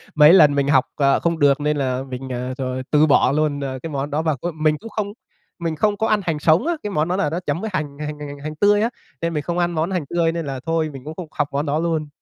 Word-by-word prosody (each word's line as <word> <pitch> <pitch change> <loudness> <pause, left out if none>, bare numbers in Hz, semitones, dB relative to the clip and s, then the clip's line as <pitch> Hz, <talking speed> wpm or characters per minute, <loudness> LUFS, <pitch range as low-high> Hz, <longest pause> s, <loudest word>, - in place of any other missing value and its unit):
Mấy 150 +2 +8
lần 150 -6 +7
mình 140 -1 +1
học, 135 -2 +4
ờ, 140 -1 +3
không 170 -1 -1
được 140 0 +4
nên 150 0 0
là 130 -2 -1
mình, 130 0 -7
ờ, 125 0 -3
rồi 130 -1 -3
từ 150 +1 +5
bỏ 145 -2 +4
luôn, 150 -1 0
à, 130 -1 -3
cái 165 - -4
món 140 0 -3
đó. 150 +2 0
Và 160 -3 0
c - - -19 0.2
mình 155 0 +1
cũng 225 - -9
không 205 -1 -3 0.5
mình 165 -2 -2
không 205 +4 +1
có 220 - 0
ăn 210 -1 +2
hành 160 -3 -1
sống 165 - +3
á, 345 - +2
cái 210 - -3
món 155 -2 0
đó 180 - 0
là 195 -5 +1
nó 165 +4 -2
chấm 145 +4 -1
với 220 - -3
hành 145 -3 -3
hành 150 0 -5
hành 150 - -6
hành 145 0 -9
hành 155 0 -5
tươi 205 +4 +3
á 230 - +2 0.3
nên 170 0 -1
mình 150 -1 -2
không 175 0 -3
ăn 175 0 +1
món 165 +2 -1
hành 180 -4 -1
tươi, 170 -1 +1
nên 165 -2 -4
là 135 -2 -4
thôi 165 -1 0
mình 135 - -9
cũng 155 - -7
không 180 -2 -7
học 145 -1 -1
món 140 +2 -1
đó 150 +1 0
luôn. 160 -2 -1
155 Hz, 305 wpm, -21 LUFS, 145-170 Hz, 0.5 s, Mấy